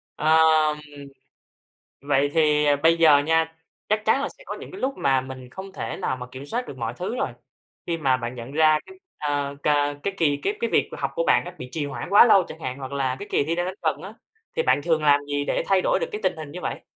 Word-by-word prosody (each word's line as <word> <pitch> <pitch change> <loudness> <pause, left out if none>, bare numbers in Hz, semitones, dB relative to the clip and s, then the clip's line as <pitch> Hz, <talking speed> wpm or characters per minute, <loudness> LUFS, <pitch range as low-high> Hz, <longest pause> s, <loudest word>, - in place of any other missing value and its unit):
Ờ, 155 +1 +3 0.6
ừm, 140 -1 -10 1.0
vậy 140 0 +1
thì 150 -2 +3 0.2
bây 165 +1 +5
giờ 155 -3 +6
nha, 160 +2 +1 0.3
chắc 215 0 0
chắn 245 +5 +3
là 280 - -1
sẽ - - -16
có - - -4
những - - -10
cái 375 - -9
lúc 270 +1 -1
mà 135 -1 +2
mình 130 -1 -9
không 190 +6 -9
thể 115 -11 -5
nào 130 - -2
mà 125 0 -7
kiểm 135 +2 -8
soát 245 +6 -3
được 135 - -8
mọi 115 0 -3
thứ 190 +7 -4
rồi, - - -1 0.6
khi 170 -1 -1
mà 135 -4 +2
bạn 120 0 -5
nhận 120 +3 -8
ra 155 0 +4
cái, 380 - -13 0.2
à, 145 -1 -2
cà 145 -1 +2
cái 200 - -2
kỳ 150 -6 +2
cái 415 - -1
cái 470 - -1
việc - - +2
mà - - -7
học - - -1
của - - 0
bạn - - +4
á 180 +1 -8
bị 125 - -7
trì 155 -3 -2
hoãn 145 - -6
quá 205 +3 +8
lâu 195 -4 +6
chẳng 160 - -10
hạn 130 -2 -5
hoặc 135 0 -7
là 130 -2 -1
cái 205 - -8
kỳ - - +2
thi 165 +3 -1
đang 175 +1 -1
đến 185 - -4
gần 155 -1 -1
á, 200 +4 -9 0.4
thì 475 - +2
bạn 145 - +2
thường 160 -2 +1
làm 145 -1 +5
gì 145 0 -2
để - - 0
thay 195 -1 +3
đổi - - +2
được - - -1
cái 425 - -4
tình - - 0
hình 155 -2 -8
như 180 - -7
vậy? - - -4
155 Hz, 265 wpm, -24 LUFS, 140-185 Hz, 1.0 s, quá